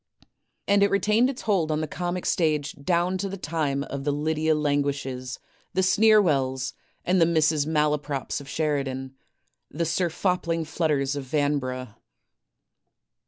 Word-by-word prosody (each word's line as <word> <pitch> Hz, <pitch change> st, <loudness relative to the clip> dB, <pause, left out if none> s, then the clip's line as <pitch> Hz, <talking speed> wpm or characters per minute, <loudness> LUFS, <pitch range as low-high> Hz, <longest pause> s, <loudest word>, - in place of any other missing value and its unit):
and 200 Hz, 0 st, +4 dB
it 200 Hz, -, +5 dB
retained 215 Hz, +5 st, +3 dB
its 270 Hz, -, -6 dB
hold 180 Hz, -7 st, +1 dB
on 155 Hz, -, 0 dB
the 155 Hz, -, -2 dB
comic 175 Hz, +3 st, -3 dB
stage 155 Hz, -4 st, +1 dB
down 175 Hz, +4 st, +1 dB
to 195 Hz, -, -2 dB
the 195 Hz, -, -5 dB
time 150 Hz, -5 st, -1 dB
of 140 Hz, -1 st, -6 dB
the 145 Hz, -, +1 dB
Lydia 155 Hz, +2 st, +1 dB
Languishes, 140 Hz, -3 st, -1 dB, 0.4 s
the 190 Hz, -, +2 dB
Sneerwells, 165 Hz, -11 st, +3 dB, 0.3 s
the 180 Hz, -, +1 dB
Mrs. 160 Hz, -4 st, +3 dB
Malaprops 150 Hz, -3 st, -1 dB
of 140 Hz, -, -12 dB
Sheridan, 135 Hz, -4 st, -2 dB, 0.6 s
the 165 Hz, +3 st, -2 dB
Sir 170 Hz, +2 st, 0 dB
Fopling 170 Hz, -2 st, -1 dB
Flutters 150 Hz, -3 st, 0 dB
of 140 Hz, -2 st, -4 dB
Vanbrugh. 130 Hz, -4 st, -1 dB
155 Hz, 135 wpm, -25 LUFS, 140-175 Hz, 0.6 s, it